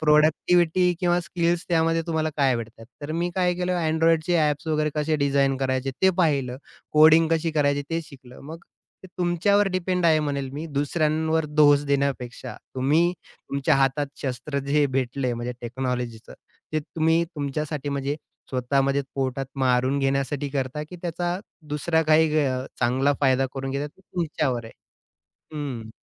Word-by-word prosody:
Productivity 160 +3 +3
किंवा 175 -1 +2
skills 175 0 -1
त्यामध्ये 165 -1 +2
तुम्हाला 160 -1 0
काय 135 -2 +3
आवडतात. 115 -1 -7 0.2
तर 145 +2 -4
मी 175 +2 -1
काय 180 -1 +2
केलं 180 +1 -1 0.2
Androidचे 165 +2 +2
ॲप्स 150 0 0
वगैरे 155 -1 +1
कसे 155 +1 0
डिझाइन 140 -1 +2
करायचे 130 0 -1
ते 190 - +6
पाहिलं. 135 -6 0 0.4
कोडिंग 160 +1 +6
कशी 165 0 +1
करायची 145 -2 +1
ते 165 0 0
शिकलो. 130 -4 -14
मग 160 +4 -9 0.4
ते - - -8
तुमच्यावर 190 +4 +2
डिपेंड 185 -1 -1
आहे 160 -1 +5
म्हणेल 140 -3 -2
मी 150 +4 -5
दुसऱ्यांवर 155 +1 +1
दोष 145 -1 +4
देण्यापेक्षा. 140 -3 -2 0.2
तुम्ही 155 +7 +2
तुमच्या 140 -5 -2
हातात 135 +2 +1 0.2
शस्त्र 135 +2 -3
जे 145 +1 +3
भेटलंय, 130 -1 -1
म्हणजे 120 +1 -4
टेक्नॉलॉजीचं. 125 -2 -4 0.4
ते 155 - +1
तुम्ही 160 +2 +1
तुमच्यासाठी 150 -2 -4
म्हणजे 140 +1 -2 0.3
स्वतःमध्ये 135 +2 +1
पोटात 135 0 -2
मारून 130 +1 +2
घेण्यासाठी 140 +1 -1
करता 135 +1 -2
की 180 - -9
त्याचा 175 +1 -2 0.3
दुसरा 160 +2 +1
काही 155 0 +4
गैर 150 -2 +2
अ, - - -8
चांगला 130 +4 +2
फायदा 135 -1 +3
करून 135 0 -4
घेता 140 +2 -2
तो 150 - -17
तुमच्यावर 155 -9 -2
आहे. 115 - -11 0.8
हं. 130 -7 -5
150 Hz, 150 wpm, -24 LUFS, 135-165 Hz, 0.8 s, ते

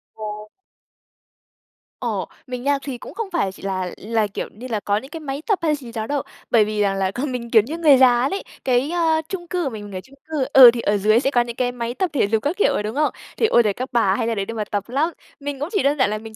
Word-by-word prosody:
Ờ. 220 - -9 1.8
Ồ, - - -2 0.2
mình 250 -1 -5
nha, 285 +1 +2
thì 270 -3 -5
cũng - - -10
không 455 -3 -4
phải 265 - 0
chỉ 190 - -15
là 185 -2 -2
là, 220 0 0
kiểu 200 - -5
như 240 +5 -9
là, 225 -4 -1
có 205 0 0
những 265 +5 -7
cái 325 - -6
máy 280 -2 -5
tập 415 -4 +2
hay 310 -2 +2
gì 255 -5 -10
đó 220 -2 -4
đâu 285 -2 -1 0.3
bởi 220 -3 +5
vì 210 0 -2
rằng 200 -1 +2
là 190 -1 0
còn 260 +6 -3
mình 240 -2 -4
kiểu 220 - +7
như 290 +10 -6
người 305 -5 +6
già 250 0 +5
luôn - - -9
ấy, 395 - -3 0.2
cái, 255 +2 +2
a, 325 -2 +2
chung 350 -3 -5
cư 360 0 -1
của 280 - -1
mình 215 -4 -7
mình 200 -2 -9
ở - - -5
chung 265 +8 -19
cư, 300 -4 0
ừ, 255 -3 +11
thì 235 - -3
ở 205 -1 +1
dưới 215 +3 +4
sẽ 270 +2 0
có 245 - +4
những 240 -1 -4
cái 250 0 0
máy 240 -1 -4
tập 370 +7 -1
thể 255 -8 +2
dục 220 +1 0
các 295 +5 0
kiểu 415 - +3
ấy, - - -1
đúng 215 +3 -4
không? 300 +1 +2 0.3
Thì, - - +3
ôi 240 - +5
giời, 205 - +2
các 255 +5 -5
bà 225 -6 +3
hay 230 +1 -1
ra 230 - 0
đấy 200 -2 -2
để 230 - -6
mà 220 -2 -2
tập 205 +1 -2
lắm. 285 +6 +1 0.3
Mình 285 -1 -5
cũng 295 +4 -3
chỉ 400 - +1
đơn 285 +2 +2
giản 260 -6 +3
là 215 - -2
mình 220 0 -10
245 Hz, 295 wpm, -21 LUFS, 215-285 Hz, 1.8 s, ừ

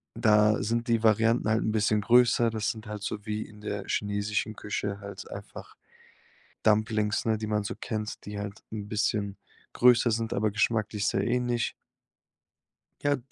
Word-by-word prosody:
da 105 -2 +4
sind 115 +2 -1
die 115 -1 +3
Varianten 115 +1 +3
halt 110 +1 +2
'n 110 - 0
bisschen 105 0 +2
größer. 120 +1 +4
Das 110 -1 -1
sind 110 -2 -10
halt 105 -1 -6
so 105 -1 -4
wie 105 -1 -2
in 105 -1 -15
der 105 -2 -4
chinesischen 105 +1 -1
Küche 100 -1 -3
halt 100 0 -8
einfach - - -9 0.9
Dumplings, 105 -1 +2
ne, 110 -1 +2
die 110 - -4
man 105 -1 +1
so - - -4
kennt, 110 -2 -4
die 105 0 -5
halt 100 0 -6
'n 105 -2 -5
bisschen 105 -2 -1 0.4
größer 125 0 +5
sind, 115 0 -2
aber 110 +1 +1
geschmacklich 110 -1 0
sehr - - +1
ähnlich. 120 -1 0 1.3
Ja 145 -1 +2
110 Hz, 160 wpm, -28 LUFS, 105-115 Hz, 1.3 s, größer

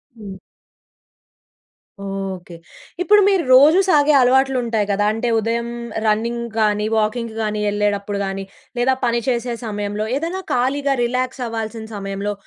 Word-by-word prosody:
హ్మ్. 200 -4 -9 1.7
ఓకే. 195 -3 -6 0.5
ఇప్పుడు 415 +3 +5
మీరు 385 -4 +2
రోజూ 295 +7 +7
సాగే 295 -3 +4
అలవాట్లు 265 +1 +3
ఉంటాయి 225 -3 0
గదా! 205 +1 +1
అంటే 225 +2 -2
ఉదయం 230 +2 -2 0.4
రన్నింగ్ 235 +2 0
గానీ, 210 -1 +1
వాకింగ్ 220 +1 -1
గానీ 210 -1 -2
ఎళ్ళేటప్పుడు 205 -1 -1
గానీ 195 0 -4 0.4
లేదా 260 +2 +2
పని 235 0 +1
చేసే 240 -1 -1
సమయంలో 205 0 -3
ఏదైనా 340 +5 -3
ఖాళీగా 275 +3 +1
రిలాక్స్ 255 +2 -2
అవ్వాల్సిన 225 0 -5
సమయంలో 200 +1 -4
230 Hz, 125 wpm, -20 LUFS, 205-255 Hz, 1.7 s, రోజూ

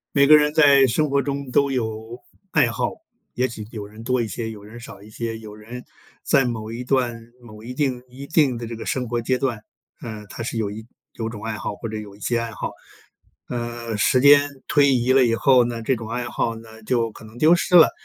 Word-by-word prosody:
每 140 0 +5
个 155 +1 +9
人 150 0 +2
在 140 -3 +6
生 145 +5 +1
活 140 0 +2
中 140 -1 -4
都 140 +2 +2
有 110 -1 -4 0.3
爱 150 -5 +4
好， 115 - -1 0.4
也 125 +2 +1
许 110 -4 -8
有 105 -3 -6
人 110 +2 -12
多 125 +1 +1
一 115 - -2
些， 110 +3 -4
有 105 -2 -11
人 110 +3 -11
少 100 -4 -11
一 105 - -14
些， 115 +1 -5
有 105 -2 -10
人 115 +4 -9 0.4
在 135 -2 +3
某 110 -2 -4
一 120 +2 -5
段 125 -3 0 0.2
某 110 -2 -13
一 125 +2 -7
定 130 -3 -1
一 135 +3 -10
定 150 -5 +3
的 115 0 -5
这 115 - -6
个 115 - -8
生 125 -2 -2
活 120 0 0
阶 125 +2 0
段， 120 -5 -1 0.4
呃， 110 -3 -7
他 115 - -6
是 115 0 -3
有 105 -2 -1
一 110 +2 -8 0.3
有 115 -1 -4
种 110 -2 -9
爱 110 0 -3
好 105 - -4
或 115 +2 -6
者 110 - -4
有 105 -2 -9
一 - - -19
些 120 +3 0
爱 115 -1 -3
好。 - - -5 0.8
呃， 120 -2 -4
时 125 +4 +3
间 145 +1 +7 0.2
推 140 -2 +4
移 125 +1 +1
了 130 -1 +5
以 115 -1 +2
后 125 0 +4
呢， 120 -1 -4
这 130 +2 +1
种 110 -1 -8
爱 120 +1 -2
好 115 -1 -1
呢， 110 0 -13
就 115 -3 +1
可 110 - -13
能 110 +2 -14
丢 155 +6 +5
失 180 - +1
了。 170 - +9
120 Hz, 255 characters per minute, -22 LUFS, 110-130 Hz, 0.8 s, 个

